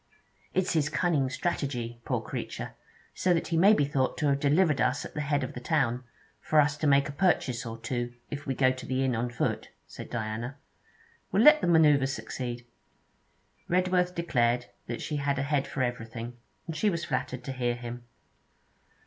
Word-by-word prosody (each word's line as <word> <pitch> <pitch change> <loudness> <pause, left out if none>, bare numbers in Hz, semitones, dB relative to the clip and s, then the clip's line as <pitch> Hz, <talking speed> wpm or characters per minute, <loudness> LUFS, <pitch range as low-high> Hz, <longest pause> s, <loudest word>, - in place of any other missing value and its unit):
'It's 185 0 +1
his 150 -3 +2
cunning 150 -4 +1
strategy, 130 -5 -3
poor - - 0
creature, - - -5 0.4
so 180 -1 +2
that 165 - -2
he 170 - 0
may 190 +6 +6
be 145 -10 +4
thought 135 -2 0
to 150 - -1
have 140 -1 +2
delivered 150 +1 +3
us 125 +2 +1
at - - -9
the 150 - -3
head 145 -1 0
of 130 - -5
the - - -6
town, 125 -3 0 0.4
for 155 - +3
us 145 0 +3
to 150 +1 -1
make 140 0 +4
a - - -5
purchase 130 -7 +1
or 115 0 -6
two, 120 +1 -3 0.2
if 145 -1 -6
we 135 - -1
go 130 0 +4
to 130 0 -7
the 130 0 0
inn 130 -2 +1
on 120 +2 -1
foot,' 120 - -2 0.2
said - - -10
Diana. 115 +3 -4 0.7
'We 200 - +3
'll - - +5
let 300 +2 +8
the - - 0
manoeuvre 150 -5 +5
succeed.' 120 -3 -5 1.0
Redworth 180 0 +2
declared 120 -7 +1 0.2
that 120 - -4
she 150 - -2
had 140 0 0
a 140 - 0
head 140 -1 0
for 135 - -2
everything, 120 -1 -4 0.3
and 165 - -5
she 210 +7 +2
was 170 -3 -2
flattered 125 0 -3
to 135 - -4
hear 120 -2 -1
him. 120 0 -7
140 Hz, 195 wpm, -28 LUFS, 125-155 Hz, 1.0 s, let